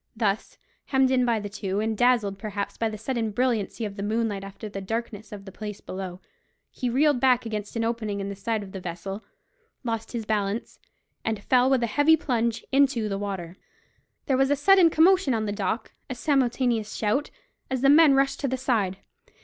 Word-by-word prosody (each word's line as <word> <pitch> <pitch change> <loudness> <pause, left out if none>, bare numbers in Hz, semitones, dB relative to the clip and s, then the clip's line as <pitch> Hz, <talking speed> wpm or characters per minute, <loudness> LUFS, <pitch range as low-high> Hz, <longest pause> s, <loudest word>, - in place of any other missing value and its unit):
Thus 215 -2 -1 0.3
hemmed 265 -1 +2
in 255 -1 +3
by 235 -2 +2
the 205 - -5
two, 200 -1 -3
and 220 +1 0
dazzled, 215 -4 +2
perhaps, 205 -2 -4
by 225 - -1
the 215 - -6
sudden 225 0 -2
brilliancy 230 -1 -1
of 200 -1 -6
the - - -4
moonlight 215 -1 -1
after 195 +2 -8
the 195 -1 -6
darkness 215 0 -4
of 200 -2 -9
the 195 - -9
place 210 +1 -7
below, 185 -1 -7 0.5
he 250 - -2
reeled 280 +2 +3
back 250 -2 +3
against 215 -1 -5
an 230 - 0
opening 225 -3 -2
in 195 - -3
the 200 - -5
side 210 +2 -2
of 190 - -10
the 190 - -6
vessel, 185 +4 -6 0.6
lost 225 -1 -3
his 230 -2 -3
balance, 210 +1 -2 0.4
and 220 -2 -2
fell 255 0 +4
with 265 -3 +2
a - - +4
heavy 290 +7 +4
plunge 235 -5 -1
into 270 -5 +3
the 195 -1 -2
water. 190 -3 -5 0.7
There 265 -3 +2
was 270 0 +3
a 285 - +3
sudden 370 +4 +6
commotion 330 -4 +4
on 220 -1 -1
the 205 - -2
deck, 205 +2 -2 0.2
a 255 - -3
simultaneous 245 -5 +1
shout, 220 +7 0 0.4
as 260 -2 -1
the 275 - +4
men 300 -2 +7
rushed 275 0 +2
to 280 - -1
the 260 0 -1
side. 220 -8 0
225 Hz, 200 wpm, -26 LUFS, 205-255 Hz, 0.7 s, men